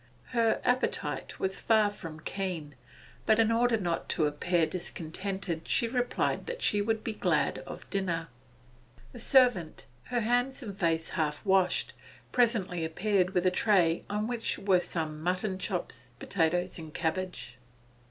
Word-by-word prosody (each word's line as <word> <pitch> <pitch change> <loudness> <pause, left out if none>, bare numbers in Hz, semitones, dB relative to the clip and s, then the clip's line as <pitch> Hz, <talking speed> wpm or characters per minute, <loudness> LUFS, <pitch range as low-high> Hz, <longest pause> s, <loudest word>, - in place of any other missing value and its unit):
Her 230 -2 +2
appetite 250 +1 0
was 190 0 -1
far 215 -2 +3
from 160 -6 -9
keen, 175 -6 -4 0.5
but 220 - +5
in 225 0 +4
order 235 0 +3
not 175 -5 -2
to 155 - +2
appear 165 +3 +1
discontented 175 +1 -3
she 235 - +2
replied 245 +1 -1
that 485 0 -5
she 205 - +3
would 220 +1 -1
be 225 - -2
glad - - +1
of - - -8
dinner. 170 -4 -1 0.8
The - - -9
servant, 245 - +3 0.2
her 245 -1 -1
hands 245 +4 +1
and 205 -4 -6
face 165 -4 0
half 150 0 -2
washed, 190 -2 +2 0.4
presently 210 -8 +1
appeared 185 +3 +1
with 180 0 +2
a 185 - +5
tray 180 -4 +3
on 210 +1 -1
which 235 -1 -2
were 190 -2 +3
some 160 -3 -3
mutton 185 +3 -1
chops, 170 - -4
potatoes, 175 +2 0
and 160 - -7
a - - -12
cabbage. 170 -6 -3
190 Hz, 150 wpm, -30 LUFS, 165-220 Hz, 0.8 s, but